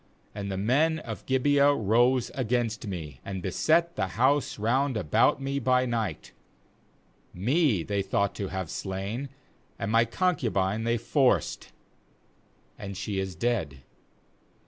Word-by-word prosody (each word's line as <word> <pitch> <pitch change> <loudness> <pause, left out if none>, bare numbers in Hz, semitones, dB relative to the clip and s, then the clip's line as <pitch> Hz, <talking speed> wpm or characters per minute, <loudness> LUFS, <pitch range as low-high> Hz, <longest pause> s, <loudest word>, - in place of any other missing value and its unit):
5And 100 -1 -4
the 95 - -3
men 145 +11 +2
of 115 -8 -8
Gibeah 140 +2 +4
rose 120 +3 +2
against 120 -3 -1
me, 80 -8 -6
and 95 -1 -5
beset 165 - +2
the 95 - -1
house 135 +3 +2
round 125 +4 +1
about 85 -8 +3
upon 135 - -11
me 140 +1 -1
by 125 0 +2
night; 115 -9 -3 1.0
me 120 - +2
they 100 +3 -1
thought 100 +1 0
to 100 - -4
have 95 -3 -4
slain, 100 +8 -4 0.5
and 100 - -3
t - - -1
my 115 +1 +4
concubine 115 - 0
they 115 0 +1
forced, 130 +3 +1 1.1
and 100 -2 -6
she 105 -1 -3
is 95 -1 -3
dead. 85 - -2
115 Hz, 140 wpm, -27 LUFS, 95-130 Hz, 1.1 s, Gibeah